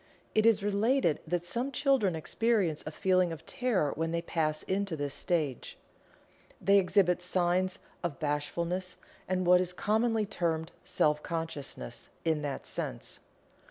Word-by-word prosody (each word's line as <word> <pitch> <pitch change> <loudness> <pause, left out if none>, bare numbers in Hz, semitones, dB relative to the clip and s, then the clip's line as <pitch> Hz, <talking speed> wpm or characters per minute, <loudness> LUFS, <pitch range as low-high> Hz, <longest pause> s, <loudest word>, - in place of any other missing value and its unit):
It 215 +1 +4
is 215 -3 +4
related 205 - +2
that 175 +1 -1
some 240 +9 -1
children 270 - +2
experience 190 -1 +1
a - - -3
feeling 185 +1 +2
of 160 0 -8
terror 215 - +1
when 165 +2 -1
they 170 0 -1
pass 155 -2 -1
into 195 -2 -1
this 145 -2 -3
stage. 155 -8 -2 0.8
They 200 0 +5
exhibit 180 -1 +3
signs 180 +1 +1 0.3
of 165 -5 -2
bashfulness 170 +5 -2 0.3
and 185 0 0
what 180 +1 +6
is 180 0 -1
commonly 220 +3 +1
termed 165 -5 -2
"self 150 0 +2
consciousness" 160 - -5 0.2
in 160 -2 +1
that 145 -2 -4
sense. - - -4
180 Hz, 140 wpm, -30 LUFS, 160-200 Hz, 0.8 s, what